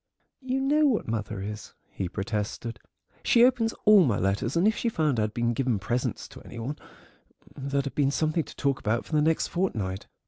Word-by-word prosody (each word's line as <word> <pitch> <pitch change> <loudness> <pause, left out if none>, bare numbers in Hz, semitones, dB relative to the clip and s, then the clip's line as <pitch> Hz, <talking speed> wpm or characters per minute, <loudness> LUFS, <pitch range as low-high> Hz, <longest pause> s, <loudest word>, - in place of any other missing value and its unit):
"You 260 0 -1
know 295 +3 +3
what 240 -6 0
mother 110 -2 -3
is," 105 +1 -7 0.2
he 95 - -4
protested; 105 +4 -4 0.4
"she 235 0 +5
opens 245 -3 +2
all 210 -3 +8
my 115 -9 +1
letters, 100 - 0
and 180 +5 +4
if 220 - +3
she 235 - 0
found 155 - 0
I'd 105 0 0
been 120 0 +1
giving 125 -2 0
presents 120 +5 -2
to - - -12
any 120 - -11
one 125 +6 -4 0.8
there'd 140 0 -2
have 140 - -4
been 140 -2 +2
something 155 +3 0
to - - -12
talk 140 -2 0
about 110 +2 -1
for - - -15
the 150 - +4
next 160 +1 +1
fortnight." 105 - -2
135 Hz, 200 wpm, -27 LUFS, 110-180 Hz, 0.8 s, all